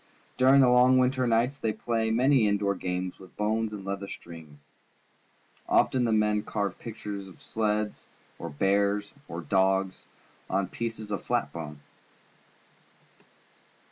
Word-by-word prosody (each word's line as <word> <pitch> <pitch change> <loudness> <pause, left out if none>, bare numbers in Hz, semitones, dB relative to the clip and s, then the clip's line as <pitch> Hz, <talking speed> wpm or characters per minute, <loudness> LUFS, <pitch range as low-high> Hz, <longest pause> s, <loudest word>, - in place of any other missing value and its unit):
During 135 +2 +6
the 130 - +6
long 125 +1 +6
winter 130 0 +2
nights 120 +5 +1
they 110 -3 0
play 110 0 -1
many 125 0 +4
in 100 0 +2
door 100 0 0
games 90 -1 -4
with 95 -2 -15
bones 110 +1 0
and 100 -2 -7
leather 100 0 -4
strings. 80 -6 -11 1.0
Often 125 -2 +3
the 115 - +1
men 105 -1 +2
carve 100 -3 -3
pictures 105 -3 -6
of 95 - -15
sleds, 105 -1 -2 0.3
or - - -5
bears, 100 +6 +1 0.2
or 85 - -5
dogs, 95 +1 +1 0.4
on 95 -1 0
pieces 110 -1 -5
of 100 -3 -2
flat 70 -4 -1
bone. 75 -3 -7
105 Hz, 140 wpm, -28 LUFS, 95-115 Hz, 1.0 s, During